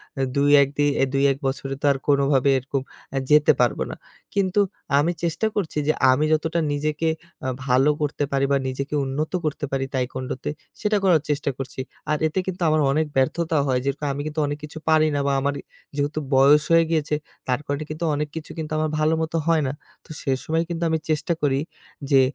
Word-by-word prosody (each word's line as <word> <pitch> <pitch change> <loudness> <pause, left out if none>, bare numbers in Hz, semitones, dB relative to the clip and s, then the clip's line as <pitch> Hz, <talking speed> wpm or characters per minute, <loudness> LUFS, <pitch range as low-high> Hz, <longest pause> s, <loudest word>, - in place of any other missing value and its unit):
অ্যা 135 - -1
২-১ 140 0 +5
দি 145 - +3
অ্যা 135 - +3
২-১ 135 0 +3
বছরে 135 0 -3
তো - - -1
আর 140 - 0
কোনোভাবে 140 -1 +3
এরকম 135 +1 -2 0.3
আ - - +1
যেতে 150 0 +6
পারবো 120 -3 +2
না। - - -6 0.4
কিন্তু 195 0 +1 0.4
আমি 160 +4 +2
চেষ্টা 170 +6 0
করছি 185 -7 -2
যে 155 - +4 0.2
আমি 140 +4 +2
যতটা 160 +2 0
নিজেকে 150 +2 -1 0.4
আ - - 0 0.2
ভালো 130 +2 +4
করতে 145 0 -1
পারি, 140 0 +2
বা 140 - +4
নিজেকে 140 +3 -3
উন্নত 140 +4 -2
করতে 150 -1 -2
পারি 135 -1 0
taekwondo 130 0 -2
তে, - - -2 0.3
সেটা 210 -1 +2
করার 175 -5 +4
চেষ্টা 145 -1 0
করছি। 135 -1 -6 0.3
আর 150 - +2
এতে 160 +4 -2
কিন্তু 185 -1 -4
আমার 155 0 +3
অনেক 155 +3 +2
ব্যর্থতা 160 +5 +1
হয়। 130 -1 +2
যেরকম 140 +1 -2
আমি 140 - -4
কিন্তু 155 +1 -4
অনেক 145 0 -3
কিছু 150 +1 -8
পারি 155 0 +5
না - - +1
বা 140 - +2
আমার 140 +1 0 0.4
যেহেতু 145 +1 -1 0.2
বয়স 140 +3 +6
হয়ে 165 0 +6
গিয়েছে, 155 -2 +1 0.3
তার 125 -1 +1
কারণে 145 +2 -2
কিন্তু 155 +2 -3
অনেক 150 +1 -1
কিছু 160 -1 -6
কিন্তু 155 -1 -5
আমার 155 0 0
ভালো 155 +1 +3
মতো 160 +1 -1
হয় 165 -2 +4
না। - - -1 0.3
তো - - -21
সে 135 - -1
সময় 160 +1 0
কিন্তু 170 0 -3
আমি 160 0 +1
চেষ্টা 155 +2 +1
করি 135 -2 +2 0.5
যে 135 -1 +7
150 Hz, 205 wpm, -23 LUFS, 135-155 Hz, 0.5 s, যে